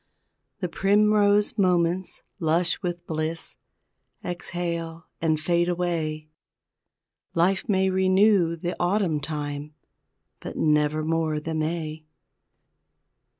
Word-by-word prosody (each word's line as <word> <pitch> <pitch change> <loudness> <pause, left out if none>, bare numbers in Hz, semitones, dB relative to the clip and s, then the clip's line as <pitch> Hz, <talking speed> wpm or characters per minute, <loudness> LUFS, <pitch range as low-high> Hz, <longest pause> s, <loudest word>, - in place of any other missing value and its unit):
The 180 - 0
primrose 205 +3 +3
moments, 180 -1 +1 0.2
lush 170 +2 +1
with 175 -2 -4
bliss, 160 +1 -3 0.7
Exhale 170 -2 -4 0.2
and 160 -2 +1
fade 175 +2 +1
away, 165 -3 -2 1.1
Life 185 +5 +1
may 190 -1 +3
renew 190 -2 +3
the 175 +2 -4
Autumn 175 -3 +1
time, 145 0 -5 0.6
But - - -7
nevermore 155 +1 +1
the 160 +2 -5
May! 155 -1 -3
170 Hz, 90 wpm, -25 LUFS, 155-185 Hz, 1.1 s, primrose